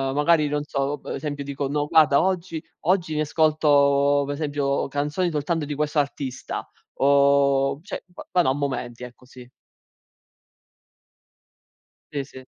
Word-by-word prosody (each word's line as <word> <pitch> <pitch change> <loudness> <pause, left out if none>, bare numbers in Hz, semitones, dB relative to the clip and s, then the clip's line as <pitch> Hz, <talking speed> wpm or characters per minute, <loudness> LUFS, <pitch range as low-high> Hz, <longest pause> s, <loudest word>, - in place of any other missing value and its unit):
magari, 150 +1 +3
non 145 0 -1
so, 140 0 -2
per - - -7
esempio, 145 -2 -4
dico: 140 0 -3
“No, 145 +1 -1
guarda, 155 -4 +5
oggi 180 -3 -2 0.2
oggi 175 -1 +1
mi 155 - 0
ascolto, 145 -2 +3
per 145 - -3
esempio, 145 -2 -1
canzoni 150 +6 -1
soltanto 155 +1 -1
di 145 - -4
questo 150 +1 0
artista”, 140 -2 -4 0.3
o, 140 0 +3
cioè, - - -6
v 180 - -12
vado 180 -5 +3
a 130 - +2
momenti, 130 -4 -4
ecco, 125 0 -12
sì. 125 -1 -14 2.6
Sì, 140 -2 -2
sì. 130 -1 -13
145 Hz, 140 wpm, -24 LUFS, 140-155 Hz, 2.6 s, guarda